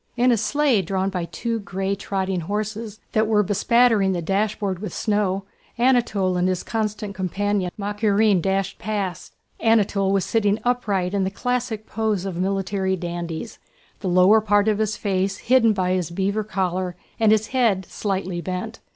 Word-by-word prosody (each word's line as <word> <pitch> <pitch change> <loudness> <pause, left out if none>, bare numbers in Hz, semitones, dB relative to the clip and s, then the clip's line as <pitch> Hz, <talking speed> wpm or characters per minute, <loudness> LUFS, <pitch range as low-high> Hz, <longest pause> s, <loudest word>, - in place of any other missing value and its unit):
In 250 +1 +4
a - - +5
sleigh 260 +1 +2
drawn 190 +2 -1
by 180 -3 -2
two 230 +5 -3
gray 195 -1 -2
trotting 190 -1 -2
horses 215 +4 -4
that 220 0 +2
were 210 -1 +3
bespattering 210 0 +3
the 175 - -2
dashboard 195 0 -1
with 200 -3 -6
snow, 205 -3 0 0.3
Anatole 235 -7 +2
and 180 +1 +2
his 185 -1 -1
constant 215 -2 -3
companion 195 +1 -1
Makárin 205 -1 +2
dashed 195 +2 -1
past. 200 -5 -4 0.2
Anatole 205 -3 +2
was 195 -1 +1
sitting 210 -2 +1
upright 205 -7 0
in 200 -1 +1
the 190 - 0
classic 245 -1 -2
pose 215 -3 -1
of 190 -3 -4
military 190 +1 -1
dandies, 175 +2 -5 0.4
the 190 - -2
lower 185 +5 +5
part 205 0 +2
of 215 -1 +2
his 215 -1 0
face 195 -1 -1
hidden 240 -2 +4
by 185 -3 0
his 185 -3 0
beaver 200 +4 -1
collar 185 -3 -2 0.2
and 220 -1 +4
his 220 0 +2
head 225 -8 +2
slightly 190 -2 -3
bent. 185 +6 -5
200 Hz, 160 wpm, -23 LUFS, 190-220 Hz, 0.4 s, a